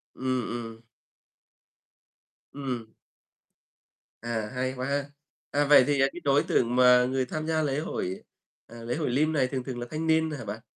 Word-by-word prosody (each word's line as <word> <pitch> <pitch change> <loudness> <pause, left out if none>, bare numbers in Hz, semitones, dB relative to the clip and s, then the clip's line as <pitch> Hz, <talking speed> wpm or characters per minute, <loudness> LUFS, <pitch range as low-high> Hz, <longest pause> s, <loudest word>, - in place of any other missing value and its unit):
Ừm, 130 0 -1
ừm. 115 -1 -6 1.7
Ừm. 125 -6 -5 1.3
À, 110 -2 -3
hay 130 +1 -1
quá 130 +1 -3
ha. 140 0 -1 0.5
À, 145 0 +2
vậy 145 -2 +7
thì, 140 -2 +2
à, 135 - +5
cái 175 - -7
đối 140 0 +3
tượng 120 0 +1
mà 125 0 +6
người 130 +1 0
tham 155 +5 -4
gia 160 -1 +1
lễ 145 -1 0
hội, 95 - -4 0.4
à, 115 0 -11
lễ 120 +1 -2
Hội 155 -5 -1
Lim 155 +5 +1
này 135 -4 +2
thường 130 -1 -4
thường 125 -2 -5
là 120 - -4
thanh 160 +3 -3
niên 160 0 +2
hả 145 - -6
bạn? 105 +3 -6
130 Hz, 180 wpm, -27 LUFS, 120-145 Hz, 1.7 s, vậy